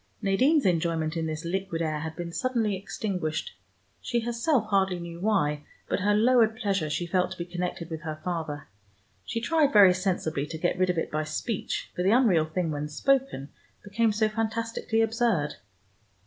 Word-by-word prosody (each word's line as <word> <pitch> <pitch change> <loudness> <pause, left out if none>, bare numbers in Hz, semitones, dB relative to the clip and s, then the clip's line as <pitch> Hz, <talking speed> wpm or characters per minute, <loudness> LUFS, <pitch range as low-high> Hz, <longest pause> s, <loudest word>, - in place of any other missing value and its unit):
Nadine's 265 +10 +3
enjoyment 165 -2 +1
in 165 -1 -1
this 155 +1 -4
liquid 185 -1 -2
air 155 -2 -1
had 160 +1 -5
been 170 -1 -5
suddenly 230 -4 0
extinguished. 185 -5 -3 0.5
She 240 -1 -1
herself 235 +2 +1
hardly 190 -2 +2
knew 170 0 -7
why, 160 -8 +1 0.2
but - - 0
her 205 +2 +2
lowered 225 0 +4
pleasure 200 -9 -1
she 175 +3 -1
felt 180 +1 +1
to - - -14
be 170 - -4
connected 175 -1 -4
with 160 -1 -4
her 155 -1 -5
father. 160 -5 -4 0.6
She 230 - -2
tried, 295 +3 +2
very 200 -5 +8
sensibly, 175 -6 -1
to 160 - -6
get 175 +2 -1
rid 185 0 +3
of 180 - 0
it 165 - -2
by 155 +1 -1
speech, 190 +7 -3
for - - -2
the 185 - +3
unreal 210 -9 +4
thing 160 +1 -2
when 150 0 -3
spoken, 265 - 0 0.3
became 215 +2 +1
so 215 +1 +2
fantastically 225 +1 -1
absurd. 225 - 0
185 Hz, 175 wpm, -27 LUFS, 160-225 Hz, 0.6 s, very